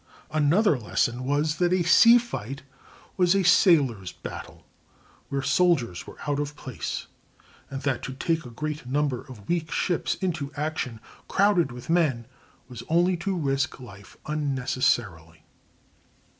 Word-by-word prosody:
Another 155 - +3
lesson 120 +3 -1
was, 150 +3 0
that 175 -1 +2
a 185 -1 +2
sea 230 +8 +7
fight 140 - -5 0.5
was 180 0 +4
a 195 - +2
sailor's 140 - +4
battle, - - -9 0.6
where 140 -1 -2
soldiers 140 - +1
were - - -11
out 145 -1 0
of 145 0 -3
place, 130 -4 -5 0.6
and 135 -1 -6
that 135 -3 0
to 135 - -5
take 165 +4 -1
a 125 - -9
great 150 +2 -5
number 140 -1 0
of 105 -6 -13
weak 170 -2 -1
ships 175 0 0
into 165 -7 -3
action, 145 -6 -3 0.3
crowded 190 -8 +2
with 120 0 -10
men, 155 -9 +1 0.4
was 125 -3 -9
only 175 +3 +3
to 190 +2 -2
risk 135 -4 -1
life 100 -6 -13
unnecessarily. 125 - -1
145 Hz, 140 wpm, -26 LUFS, 125-170 Hz, 0.6 s, sea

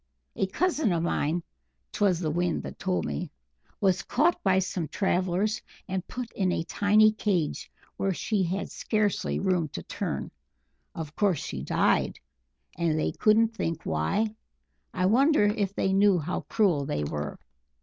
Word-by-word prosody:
A 190 - 0
cousin 310 - +1
of 165 -1 0
mine 170 0 0 0.5
'twas 195 -5 +2
the 160 -4 -1
Wind 175 +1 0
that - - -8
told 185 -1 -1
me 175 - -3 0.5
was 190 -3 +2
caught 320 +7 +1
by 190 -1 +3
some 185 -3 -1
travellers 190 +3 0 0.3
and 190 -1 -3
put 245 -2 -6
in 185 -2 0
a 165 - -1
tiny 210 +4 +4
cage 195 -7 -1 0.3
where 195 - 0
she 205 +3 -1
had 185 +2 -2
scarcely 215 -2 0
room 180 -4 +1
to 85 - -5
turn. - - -4 0.6
Of 155 -2 -6
course 195 -8 +1
she 65 - -5
died, 70 - +1 0.6
and 165 -2 0
they 155 - 0
'couldn't 220 +1 +4
think 165 -7 -2
why'! 200 - 0 0.6
I 185 - 0
wonder 270 +6 +4
if 205 -2 +1
they 190 - +1
knew 200 -1 +5
how 165 +2 -2
cruel 185 -10 +2
they 75 0 -1
were?" 75 0 -4
190 Hz, 155 wpm, -27 LUFS, 170-210 Hz, 0.6 s, knew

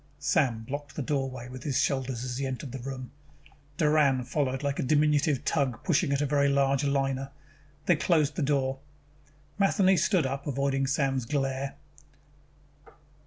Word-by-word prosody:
Sam 135 -5 +1
blocked 145 +3 -6
the 145 - -3
doorway 130 -3 -2
with 130 0 -9
his 135 -1 -1
shoulders 130 -3 -1
as 125 -1 -4
he 135 - -1
entered 130 0 -5
the 135 - -6
room. 130 0 -6 0.7
Doran 150 -4 +3
followed 135 0 -1
like 140 -1 -1
a - - +2
diminutive 150 0 +2
tug 135 -7 0
pushing 170 -3 +2
a - - +3
very 140 0 +2
large 140 0 +2
liner. 135 -1 0 0.6
They 175 - +4
closed 150 0 +2
the - - -2
door. 135 -2 0 0.8
Matheny 195 -1 +4
stood 170 -1 +2
up, 135 +2 -3
avoiding 135 0 0
Sam's 135 -3 0
glare. 135 0 -2
140 Hz, 150 wpm, -28 LUFS, 130-145 Hz, 0.8 s, They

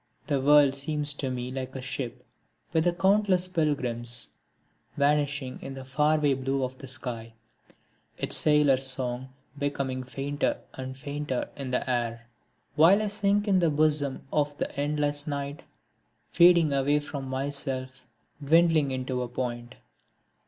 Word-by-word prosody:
The 140 -3 0
world 145 0 +6
seems 145 +1 +1
to 140 -2 -3
me 125 0 -4
like 130 0 -5
a - - -4
ship 125 -2 -5 0.5
with 160 +1 +2
its 175 0 -1
countless 195 -2 +3
pilgrims, 125 -8 -1 0.6
Vanishing 145 -2 0
in 135 - -7
the 135 -1 -8
far 150 +4 +2
away 145 -2 +2
blue 135 +1 -1
of 130 0 -3
the 135 - -9
sky, 120 -3 -5 0.8
Its - - 0
sailors' 145 -3 +4
song 130 0 -1 0.3
becoming 140 -2 -2
fainter 140 +3 -2 0.2
and 130 0 -7
fainter 145 -2 -4
in 140 -3 -5
the 125 - -1
air, 115 -2 -2 0.5
While 170 +6 +6
I 210 - -1
sink 205 0 +1
in 195 -2 +4
the 170 -2 +3
bosom 150 -2 +1
of 145 -1 0
the - - -4
endless 145 0 0
night, 140 0 -4 0.7
fading 170 -4 +5
away 140 +2 +2
from 145 -2 -6
myself, 130 -1 -4 0.4
dwindling 160 -1 +4
into 130 -1 -3
a 125 - -3
point. 120 0 -5
140 Hz, 145 wpm, -27 LUFS, 130-150 Hz, 0.8 s, world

